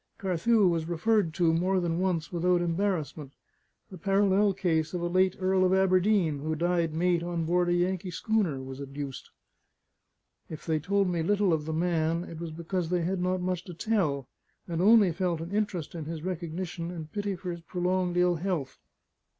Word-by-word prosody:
Carthew 195 +3 +2
was 165 -2 0
referred 175 +2 +1
to 170 -2 +3
more 185 +3 +2
than 170 -1 -1
once 175 -5 -1
without 175 +1 +2
embarrassment; 165 -5 -2 0.6
the 185 - -9
parallel 200 +2 +3
case 175 -4 0
of 175 - -2
a - - -1
late 185 +1 +2
Earl 185 0 +2
of 185 0 +3
Aberdeen, 185 -4 +3
who 155 +2 -2
died 170 -1 0
mate 175 0 +2
on 170 -1 -2
board 175 +1 +2
a - - +3
Yankee 180 +1 0
schooner, 180 - -1
was 130 +1 -8
adduced. 140 -1 -7 1.2
If 155 - -8
they 160 -2 +1
told 195 +4 +1
me 175 -2 0
little 200 +1 +2
of 150 -2 -1
the 160 - -3
man, 165 0 0
it 165 -2 -9
was 170 -1 -5
because 170 +2 -3
they 175 -1 +1
had 180 +2 -1
not 185 0 0
much 180 -1 -2
to 180 - -9
tell, 160 - 0 0.4
and 170 -1 -2
only 210 -2 +6
felt 175 -1 -1
an 165 +3 -6
interest 200 -7 -2
in 165 -3 -6
his 160 0 -6
recognition 175 -1 -4
and 160 -3 -7
pity 205 0 -2
for 180 0 -5
his 170 0 -7
prolonged 180 +1 -1
ill 180 -1 +3
health. 165 -6 -3
175 Hz, 185 wpm, -28 LUFS, 165-185 Hz, 1.2 s, only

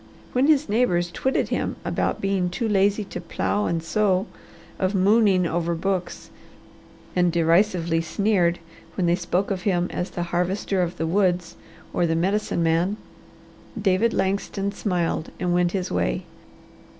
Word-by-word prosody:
When 255 +3 +3
his 305 -1 +3
neighbours 180 -6 +1
twitted 265 +9 0
him - - -1
with - - -1
being 195 -2 0
too 225 +6 -2
lazy 205 0 +2
to 180 -3 -7
plow 205 +4 -1
and 165 -1 -1
sow, 190 +1 +1 0.5
of 190 +2 0
"mooning" 195 -1 +4
over 170 0 -1
books, 185 +1 -3 0.8
and 175 -1 +3
derisively 170 0 +2
sneered 175 -1 +1 0.4
when 185 - 0
they 170 - +3
spoke 180 +2 -1
of 190 -2 -2
him 180 -2 0
as 180 - -3
the 175 - -3
Harvester 185 +2 0
of 175 0 -2
the 165 - -1
Woods 180 -1 +1 0.4
or 175 - +1
the 165 - +1
Medicine 185 0 0
Man, 170 +5 +1 0.8
David 205 +3 +2
Langston 195 0 -1
smiled 175 -6 -1
and 180 -1 0
went 175 0 +2
his 190 -2 -2
way. - - 0
185 Hz, 150 wpm, -24 LUFS, 175-200 Hz, 0.8 s, mooning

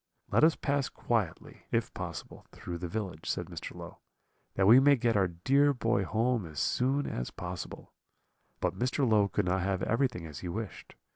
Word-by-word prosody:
"'Let - - +4
us 160 0 +6
pass 140 -2 0
quietly, 110 -9 -3
if - - 0
possible, - - -7
through 85 -1 -6
the 90 - -4
village,' 90 -4 -4
said - - -1
Mr. - - -8
Low, - - -9 0.6
'that 95 - +3
we 115 +6 +9
may 140 +1 +6
get 120 -2 +1
our 100 -2 +3
dear 135 +12 +2
boy 115 -4 +1
home 115 +4 +1
as 75 -2 -7
soon 135 +3 +1
as - - -3
possible;' 90 0 -7 0.7
but - - 0
Mr. 130 +2 +1
Low 105 -3 +4
could 100 - -1
not 90 +1 +1
have 95 0 -1
everything 115 -7 0
as 75 -4 -8
he 90 - -6
wished. 105 +3 -6
110 Hz, 185 wpm, -30 LUFS, 90-125 Hz, 0.7 s, we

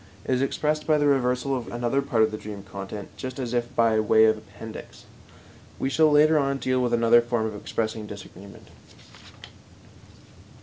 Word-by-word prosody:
It - - 0
is 130 - +1
expressed 150 +2 -1
by 155 -1 +4
the 145 - +1
reversal 135 -1 +1
of 125 -2 -5
another 120 +3 0
part 125 -5 +1
of 110 - +1
the 110 - -5
dream 105 -2 -8
content 100 +1 -8
just 130 -1 -6
as 125 -3 -4
if 120 -1 -2
by 115 -2 +3
way 110 +1 +5
of 110 0 +4
appendix. 110 +1 -11 0.7
We 135 - -2
shall 155 0 +4
later 155 +1 +5
on 140 -1 0
deal 130 -1 0
with 120 -1 0
another 115 0 +5
form 120 -1 -1
of 110 -1 -4
expressing 110 +1 -4
disagreement. 100 -1 -12
120 Hz, 175 wpm, -25 LUFS, 110-135 Hz, 0.7 s, way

